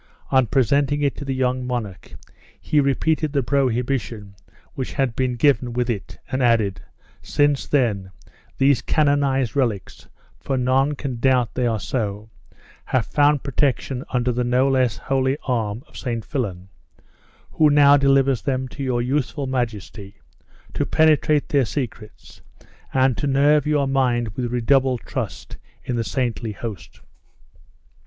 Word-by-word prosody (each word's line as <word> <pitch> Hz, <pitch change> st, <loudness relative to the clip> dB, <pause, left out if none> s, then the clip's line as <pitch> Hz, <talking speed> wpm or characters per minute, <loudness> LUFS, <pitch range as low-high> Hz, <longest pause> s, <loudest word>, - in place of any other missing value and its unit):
On 130 Hz, -3 st, +4 dB
presenting 140 Hz, +4 st, +1 dB
it 140 Hz, -, +1 dB
to 145 Hz, -, -6 dB
the 135 Hz, -1 st, -2 dB
young 130 Hz, 0 st, 0 dB
monarch, 115 Hz, -7 st, -5 dB, 0.4 s
he 150 Hz, -, +1 dB
repeated 150 Hz, +2 st, +1 dB
the 140 Hz, -2 st, +1 dB
prohibition 120 Hz, -5 st, -1 dB, 0.4 s
which 130 Hz, -, -5 dB
had 130 Hz, -4 st, -1 dB
been 130 Hz, -2 st, 0 dB
given 125 Hz, -1 st, +2 dB
with 120 Hz, 0 st, 0 dB
it, 100 Hz, -4 st, -6 dB
and 130 Hz, -, -1 dB
added, 115 Hz, -5 st, +2 dB, 0.4 s
"Since, 145 Hz, -1 st, +1 dB
then, 105 Hz, -9 st, 0 dB, 0.5 s
these 135 Hz, -3 st, +3 dB
canonized 140 Hz, -4 st, +1 dB
relics 115 Hz, -, -2 dB, 0.3 s
(for 135 Hz, -, -2 dB
none 130 Hz, +3 st, +1 dB
can 130 Hz, -4 st, -5 dB
doubt 125 Hz, -3 st, +2 dB
they 125 Hz, -1 st, 0 dB
are 110 Hz, -2 st, -1 dB
so) 105 Hz, -2 st, -4 dB, 0.5 s
have 130 Hz, -4 st, 0 dB
found 145 Hz, -1 st, +2 dB
protection 135 Hz, -1 st, -1 dB
under 125 Hz, -1 st, 0 dB
the 125 Hz, +1 st, -1 dB
no 125 Hz, +2 st, +2 dB
less 130 Hz, -7 st, +1 dB
holy 130 Hz, -, 0 dB
arm 115 Hz, -2 st, -2 dB
of -, -, -22 dB
St. 115 Hz, -4 st, -4 dB
Fillan, 95 Hz, -8 st, -4 dB, 0.9 s
he 155 Hz, -, +5 dB
now 145 Hz, -1 st, +6 dB
delivers 135 Hz, -3 st, +3 dB
them 130 Hz, -1 st, -2 dB
to 140 Hz, -, -9 dB
your 125 Hz, -3 st, 0 dB
youthful 140 Hz, +2 st, -1 dB
majesty, 110 Hz, -5 st, -4 dB, 0.6 s
to -, -, -1 dB
penetrate 155 Hz, -1 st, +2 dB
their 140 Hz, -2 st, +3 dB
secrets, 115 Hz, -3 st, -6 dB, 0.5 s
and 130 Hz, -1 st, +2 dB
to 145 Hz, -, -2 dB
nerve 145 Hz, +2 st, +3 dB
your 145 Hz, -2 st, +1 dB
mind 125 Hz, -4 st, +1 dB
with 120 Hz, +3 st, -4 dB
redoubled 130 Hz, 0 st, +2 dB
trust -, -, -6 dB, 0.3 s
in 125 Hz, -, -3 dB
the 115 Hz, -, 0 dB
saintly 115 Hz, -3 st, -2 dB
host." 105 Hz, -5 st, -8 dB
130 Hz, 145 wpm, -22 LUFS, 115-140 Hz, 0.9 s, now